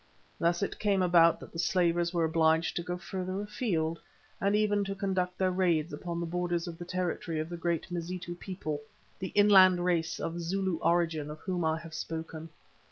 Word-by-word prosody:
Thus 170 +3 +1
it - - -3
came 200 -3 +2
about 170 -2 +5
that - - -11
the 165 - -6
slavers 170 -1 +2
were 170 -2 +1
obliged 160 0 +2
to - - -1
go 180 +1 -4
further 185 +2 -4
afield 180 -6 -1 0.4
and 200 +1 +2
even 205 -1 +2
to 195 0 -3
conduct 185 -2 -1
their 185 -1 +2
raids 175 -3 +1
upon 170 -1 -4
the 170 - -2
borders 175 0 -1
of 165 -1 -7
the 175 - -6
territory 175 -2 -2
of 155 +1 -3
the 175 - -5
great 170 0 -2
Mazitu 175 0 -4
people, 175 -5 -5 0.4
the 185 - -3
inland 190 -3 +6
race 165 -2 0
of 165 +1 -3
Zulu 190 +1 -1
origin 165 -3 +1
of 150 - -7
whom 180 -2 -2
I 160 0 +1
have 165 -1 -10
spoken. 160 0 -5
175 Hz, 190 wpm, -30 LUFS, 165-185 Hz, 0.4 s, inland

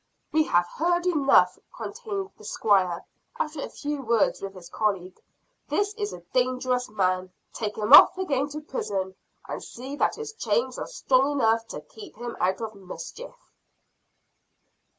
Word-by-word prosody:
"We 310 +1 +3
have 175 - +2
heard 345 - 0
enough," 295 -6 +4 0.2
continued 400 -2 -5
the - - -17
Squire, 190 -5 +1 0.3
after 305 -2 -2
a - - -4
few 295 -1 -4
words 230 -3 +2
with 195 0 -6
his 180 -2 -11
colleague. 190 -3 -2 0.5
"This 410 0 0
is 415 -1 -3
a 175 - -9
dangerous 250 0 +1
man. 185 -3 0 0.2
Take 210 -2 -4
him 215 +4 +2
off - - +10
again 290 -7 0
to 300 +1 -6
prison; 195 -10 -3 0.3
and - - -5
see 260 +4 -7
that - - +2
his 445 -1 -6
chains 475 +2 0
are - - -4
strong 275 - +2
enough 225 -4 +2
to - - -7
keep 420 -4 -13
him 240 +1 -6
out 190 +4 +1
of 220 -1 -4
mischief." 205 - -9
255 Hz, 155 wpm, -26 LUFS, 205-320 Hz, 0.5 s, off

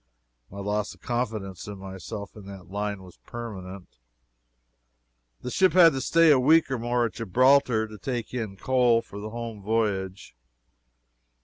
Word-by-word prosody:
My 100 - -11
loss 105 +1 -2
of - - -28
confidence 110 -7 -3
in 105 -1 -7
myself 95 +2 -8
in 105 -2 -12
that 95 -2 -11
line 105 -1 -3
was 90 -2 -15
permanent. 95 - -9 1.4
The 125 - -5
ship 185 +6 +3
had 170 -3 +7
to 135 - -2
stay 165 +4 +5
a 140 - +5
week 155 +2 +4
or 130 - -1
more 120 +1 +1
at 115 - -4
Gibraltar 125 +1 +3
to 105 -1 -12
take 120 +4 -4
in 110 -6 -4
coal 120 -1 +2
for 100 -3 -10
the 105 +1 -6
home 115 -2 -6
voyage. 100 - -2
110 Hz, 155 wpm, -26 LUFS, 100-125 Hz, 1.4 s, had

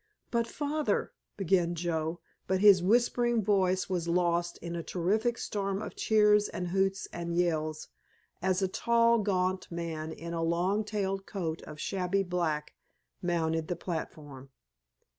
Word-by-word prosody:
"But, 235 -1 +1
Father——" 295 +3 -1 0.2
began 180 -3 +2
Joe, 165 0 -2 0.3
but 190 0 +1
his 200 -2 +7
whispering 240 +3 +2
voice 190 -2 +2
was 175 -3 -2
lost 175 0 +1
in 170 0 -6
a 170 - -2
terrific 215 +8 0
storm 195 -1 -2
of - - -6
cheers 210 -1 +4
and 180 0 -4
hoots 195 +1 0
and 170 0 -3
yells 155 -3 0 0.5
as 185 +1 +1
a - - +3
tall, 235 +4 +3
gaunt 185 -2 0
man 165 -2 -4
in 170 +1 -7
a 165 - -2
long 175 +6 +1
tailed 195 -2 -2
coat 165 -5 -3
of 150 - -9
shabby 195 +2 0
black, 170 -5 -2 0.5
mounted 160 -2 0
the 175 - -1
platform. 150 -6 -6
180 Hz, 140 wpm, -30 LUFS, 170-200 Hz, 0.5 s, his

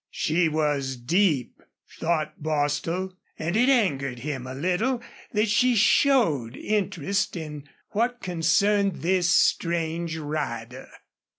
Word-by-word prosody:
She 165 +1 +1
was 145 -4 -1
deep, 150 - 0 0.4
thought 160 -3 -1
Bostil, 155 +5 -1 0.2
and 165 +4 -2
it 245 +4 +4
angered 140 - +1
him 130 0 -5
a 130 - -6
little 185 - 0 0.3
that 210 +1 +2
she 245 +4 +3
showed 200 - +3
interest 200 -2 -1
in 150 -4 -7 0.2
what 240 +3 0
concerned 190 - +1
this 180 0 +2
strange 170 -1 +1
rider. 130 -5 -5
165 Hz, 110 wpm, -25 LUFS, 145-200 Hz, 0.4 s, it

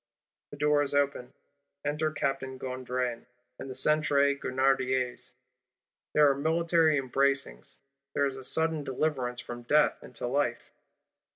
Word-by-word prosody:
' - - -65
The 145 - -10
door 150 0 +2
is 145 0 0
opened; 140 -3 0 0.5
enter 150 +2 0
Captain 135 -3 -3
Gondran 125 -2 -4 0.3
and 135 - -7
the 130 - -5
Centre 140 0 +2
Grenadiers: 130 -2 -1 0.8
there 150 -1 +6
are 140 - +4
military 160 +1 +2
embracings; 135 - -1 0.4
there 145 - +2
is 135 -2 +1
sudden 160 -2 +3
deliverance 130 -3 -2
from 120 0 -8
death 150 +5 +2
into 125 0 -7
life. 125 -1 -1
135 Hz, 125 wpm, -29 LUFS, 130-150 Hz, 0.8 s, there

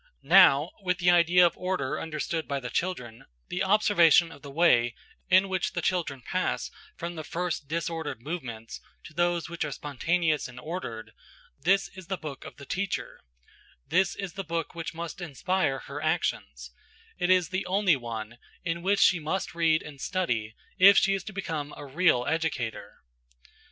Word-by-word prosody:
Now 145 +5 +6
(with 180 -2 0
the 175 -1 +4
idea 175 +1 +5
of 170 - +1
order 180 -7 -2
understood 160 +1 -3
by 140 -1 -2
the 125 -2 -7
children) 125 -11 -3 0.2
the 180 - -1
observation 190 -5 +5
of 140 - -13
the 140 - -9
way 130 -7 +3 0.3
in 190 +1 +5
which 185 -2 -1
the 175 - -2
children 155 -8 -1
pass - - -2 0.3
from 170 +1 -5
the 160 -2 -6
first 170 -2 -3
disordered 165 -3 -3
movements 120 -6 -6 0.2
to 160 - -12
those 175 0 0
which 170 -1 -4
are 155 - -3
spontaneous 155 +3 0
and 125 0 -11
ordered–this 165 - -3
is 185 -3 -12
the 190 0 -2
book 150 -5 -8
of - - -10
the 140 - -12
teacher; 190 +6 -3 0.7
this 185 0 +2
is 195 -4 -5
the 195 - -5
book 165 -1 -3
which 165 0 -6
must 170 +1 -6
inspire 165 -1 -1
her 145 +1 -7
actions; 150 - -2 0.5
it 180 0 0
is 180 -3 +4
the 185 0 -2
only 190 -2 +3
one 115 -2 -6 0.2
in 170 0 -2
which 195 +2 +2
she 180 - +5
must 160 +4 -3
read 165 -1 +2
and 140 -2 -11
study 120 - -2 0.2
if 195 +1 +8
she 195 - +4
is 195 -2 -2
to - - -6
become 160 -7 -4
a 145 - -8
real 140 -3 +2
educator. 160 -8 -3
165 Hz, 170 wpm, -27 LUFS, 140-180 Hz, 0.7 s, if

